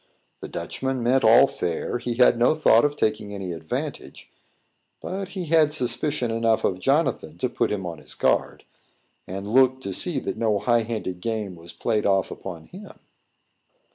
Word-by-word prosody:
The - - -7
Dutchman 130 -2 -4
meant 130 +3 +2
all 115 +4 +7
fair; 90 0 -3
he 120 0 -3
had 125 0 +5
no 125 +6 +4
thought 120 -7 +5
of 145 0 +1
taking 105 -5 -1
any 95 -2 -5
advantage: 80 -2 -6 0.7
but 195 +1 -5
he 180 - -3
had 155 -2 +3
suspicion 125 -1 0
enough 115 -1 +1
of 90 - 0
Jonathan 135 - 0
to - - 0
put - - -1
him 100 -3 -3
on 85 -3 -6
his - - -9
guard, - - 0 0.6
and 95 +2 -6
look 130 0 +4
to 100 - -5
see - - -1
that - - -4
no 110 -3 +1
high 120 +3 +2
handed 110 -6 -4
game 110 -4 -3
was 85 0 -11
played 105 -2 -1
off 95 -1 +1
upon 85 -4 -8
him. 200 +3 -12
115 Hz, 170 wpm, -24 LUFS, 95-130 Hz, 0.7 s, all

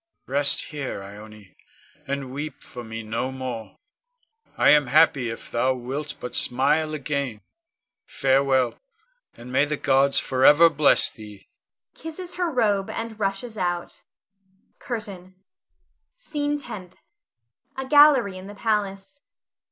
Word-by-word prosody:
Rest 140 +2 +2
here, 135 -9 -5
Ione, 105 0 -13 0.5
and 135 -2 -4
weep 145 0 -6
for 120 - -9
me 110 0 -7
no 115 +4 -3
more. 130 -4 -7 0.8
I - - +4
am 150 -3 +5
happy 140 -3 +3
if 115 - -8
thou 130 +2 +1
wilt 135 +5 -5
but 125 - -7
smile 150 +5 +1
again. 140 -6 -3 0.7
Farewell, 135 -3 +1 0.6
and 120 +2 -11
may 135 +3 +3
the 150 0 -3
gods 135 0 +2
forever 145 +6 +5
bless 150 -1 +4
thee! 105 -2 -13 0.5
[Kisses 345 +3 -8
her 355 -2 0
robe, 210 -8 +1
and 225 -1 -5
rushes 205 +2 -3
out.] 175 -1 -3 0.8
CURTAIN. 195 -6 -7 0.8
SCENE 295 -11 -3
TENTH. 205 -10 -9 0.8
[_A 265 0 -4
gallery 275 -10 +5
in 185 - -10
the 205 - -10
palace. 210 +4 -2
150 Hz, 120 wpm, -24 LUFS, 130-205 Hz, 0.8 s, am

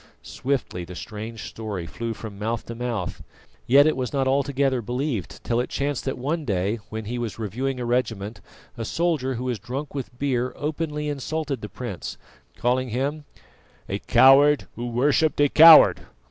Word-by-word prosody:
Swiftly 130 -9 -3
the 90 +1 -9
strange 110 +3 -7
story 105 -6 -5
flew 115 +9 -5
from 105 -3 -9
mouth 115 +2 -2
to 115 - -6
mouth, 115 -6 -4 0.5
yet 140 +4 +7
it 155 - +2
was 130 -2 -3
not 135 -2 0
altogether 135 -1 +1
believed 125 - -3
till 120 0 0
it 125 - -2
chanced 140 -1 -2
that 135 - -2
one 150 +6 -2
day 100 -2 -1
when 110 0 -5
he 120 +3 -4
was 115 -3 -4
reviewing 125 +5 -3
a 120 - -3
regiment, 115 -3 -2 0.4
a - - -2
soldier 150 -3 0
who 120 - -4
was 125 -4 -2
drunk 135 +8 -6
with 130 -3 -6
beer 125 -2 -1
openly 150 0 -3
insulted 145 -2 -3
the 105 - -6
prince, 120 -8 -6 0.4
calling 125 +1 0
him 140 +6 -2 0.6
"a - - -3
coward 140 +2 +5
who 120 +1 -4
worshipped 145 +6 +2
a 145 -1 +5
coward." 160 +1 +8
125 Hz, 170 wpm, -24 LUFS, 115-140 Hz, 0.6 s, coward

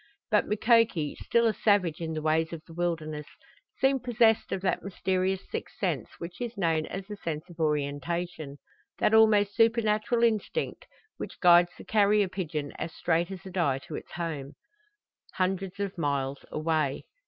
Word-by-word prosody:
But - - +3
Mukoki, 220 -8 +3
still 235 0 +3
a 225 - +3
savage 195 -7 +2
in 160 -1 -3
the 155 -1 -4
ways 160 +1 +1
of 160 -2 -7
the 165 - -13
wilderness, 160 -3 -3 0.5
seemed 270 -1 +3
possessed 230 -2 +3
of 190 - -2
that 185 - 0
mysterious 190 0 -1
sixth - - -5
sense - - -1
which 170 +4 -8
is 235 -2 -4
known 165 -4 +1
as 195 +1 -6
the 210 +1 -7
sense 160 -2 -4
of 170 - -15
orientation 150 +1 -2 0.4
that 210 - +2
almost 210 -2 +5
supernatural 225 +1 +2
instinct 230 - 0 0.3
which - - -7
guides 175 -1 +6
the - - -11
carrier 210 -1 +3
pigeon 160 -6 -4
as 165 - -3
straight 170 +1 +1
as 190 0 -8
a 190 - -8
die 170 -8 +1
to 135 - -10
its - - -8
home 155 -5 -4
cote 420 +7 -33
hundreds 190 0 -1
of 200 -1 -2
miles 140 -2 -1
away. 155 -3 0
180 Hz, 165 wpm, -28 LUFS, 160-210 Hz, 0.5 s, guides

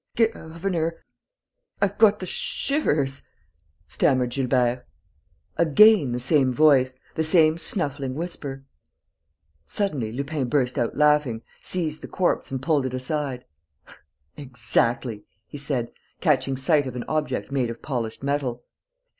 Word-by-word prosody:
"Governor, 170 -6 -1 0.8
I've 200 -2 0
got 210 -2 +6
the 185 - -5
shivers," 150 - 0 0.7
stammered 125 -2 +1
Gilbert. 125 -1 0 0.7
Again 170 - +5
the 120 - -2
same 135 0 +2
voice, 130 -2 +4 0.2
the 160 - -1
same 155 -1 +4
snuffling 140 -7 -1
whisper. 145 -5 -6 1.0
Suddenly, 135 - -2
Lupin 140 +1 -3
burst 125 -2 0
out 120 - -2
laughing, 150 -6 +2 0.2
seized 160 -4 -3
the - - -8
corpse 185 -2 -1
and 130 -1 -5
pulled 145 -3 +1
it 130 - -5
aside: 130 -1 -3 0.9
"Exactly!" 120 -4 0 0.2
he 145 - -9
said, 135 -5 -2 0.3
catching 135 -5 +1
sight 145 +1 +2
of 125 - -6
an 125 - -4
object 150 -4 -2
made 130 -4 0
of 115 - -8
polished 120 -4 -4
metal. 140 -4 -2
140 Hz, 120 wpm, -24 LUFS, 125-155 Hz, 1.0 s, got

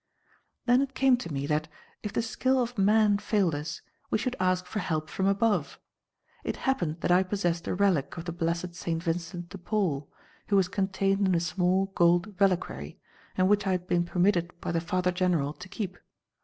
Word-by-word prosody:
"Then 245 +1 +5
it 270 -1 -3
came 265 -1 +5
to 245 -9 -7
me 140 -1 -2
that, 155 +1 0 0.3
if 210 - -4
the 225 - 0
skill 260 +3 +1
of 245 0 -1
man 205 0 +4
failed 200 -6 +1
us, 150 +1 -5 0.3
we - - +2
should 255 +3 -2
ask 185 0 +1
for 210 +4 -4
help 155 -4 -2
from 190 - 0
above. 195 -7 +1 0.6
It - - -2
happened 175 -12 0
that - - +1
I 180 +1 +6
possessed 175 -3 -1
a - - -1
relic 180 -7 +1
of 165 - -6
the 170 - -3
blessed 170 +1 -2
Saint 170 -1 -3
Vincent 170 0 -3
de 195 - -9
Paul, 165 -8 -1 0.4
which - - -3
was 190 -2 +4
contained 195 0 +1
in 185 - +3
a - - +3
small 180 +3 +1
gold 175 +4 +3
reliquary, 175 - 0 0.4
and 185 0 +4
which 205 0 +2
I 190 - +2
had 180 -1 -2
been 175 -1 +1
permitted 175 -1 +1
by - - -3
the 165 -1 0
Father 180 0 0
General 175 -6 +1
to 190 - -11
keep. 200 -2 -5
180 Hz, 195 wpm, -28 LUFS, 170-200 Hz, 0.6 s, I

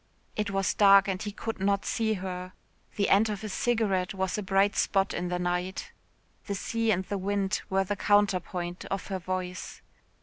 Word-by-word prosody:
It 210 -1 -1
was 195 -2 0
dark 200 -1 +6
and 190 -1 -2
he 210 - -3
could 225 +1 -5
not 200 +1 +1
see 220 -1 0
her. 185 -1 -5 0.4
The 200 - +1
end 210 +3 +4
of 205 -2 -3
his 215 -3 -5
cigarette 200 -6 0
was 190 -1 -1
a 210 - -2
bright 195 +1 +2
spot 195 0 +1
in 180 - -2
the 180 0 -1
night. 180 +1 -2 0.6
The 200 - -2
sea 230 +3 -1
and 190 -3 +2
the 200 +1 -3
wind 200 +1 0
were 195 0 +2
the 205 +2 -2
counterpoint 185 -4 +1
of 195 -3 -3
her 190 -1 -2
voice. 185 0 -5
195 Hz, 190 wpm, -28 LUFS, 185-205 Hz, 0.6 s, dark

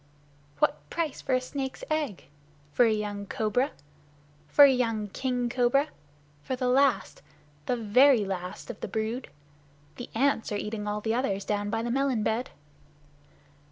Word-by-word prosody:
"What 145 -1 0
price 320 -4 -2
for 260 - +1
a - - +3
snake's 265 0 -5
egg? 300 - -2 0.5
For 245 - +5
a 225 - +3
young 205 -1 -3
cobra? 225 +7 0 0.8
For 285 - +8
a 275 - +6
young 225 -4 -1
king 250 +2 -1
cobra? 250 +4 +2 0.5
For 260 - -3
the 250 0 -1
last 260 -4 +2 0.5
the 245 - +1
very 235 +1 +5
last 185 0 -5
of - - -13
the - - -4
brood? 220 +5 -3 0.7
The 245 - -7
ants 265 -2 +1
are - - -1
eating 210 0 -4
all 210 0 -2
the 220 +1 0
others 200 -6 -1
down 205 0 -1
by 225 +1 -1
the 240 - -2
melon 265 -4 +1
bed." 225 +4 -1
235 Hz, 155 wpm, -28 LUFS, 210-260 Hz, 0.8 s, For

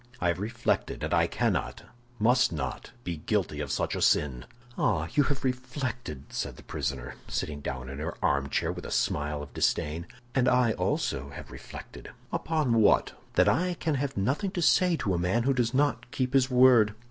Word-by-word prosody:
I 90 - +1
have 85 - -1
reflected, 115 +4 -1
and - - -1
I - - +4
cannot, - - -1 0.3
must 125 +4 +4
not 65 -5 -4
be 85 -2 -3
guilty 75 - -1
of - - -3
such - - -1
a - - -3
sin." 65 -4 +2 0.3
"Ah, - - +1
you 145 - +4
have 145 0 -2
reflected!" 125 - -3
said - - -4
the - - -13
prisoner, 65 -2 -4
sitting 75 -1 -3
down 65 -2 -4
in 70 +2 -7
her 80 +2 -4
armchair, 70 0 +1
with - - -7
a - - -7
smile 75 0 0
of 70 - -12
disdain; 80 +3 0 0.3
"and 130 -1 +2
I 125 -2 +4
also 70 -9 -1
have 70 - -10
reflected." - - -10 0.2
"Upon 145 -8 +1
what?" 105 - +4 0.2
"That - - +5
I 180 +5 +2
can 160 -2 -1
have 140 -2 -2
nothing 140 - 0
to 175 - -1
say 180 -1 +4
to 100 -10 -1
a 85 - 0
man 95 +7 +1
who 135 +2 +3
does 120 -3 +1
not 140 -1 +1
keep 130 +1 -2
his 135 -1 +4
word." 125 -4 +6
115 Hz, 190 wpm, -28 LUFS, -, 0.3 s, word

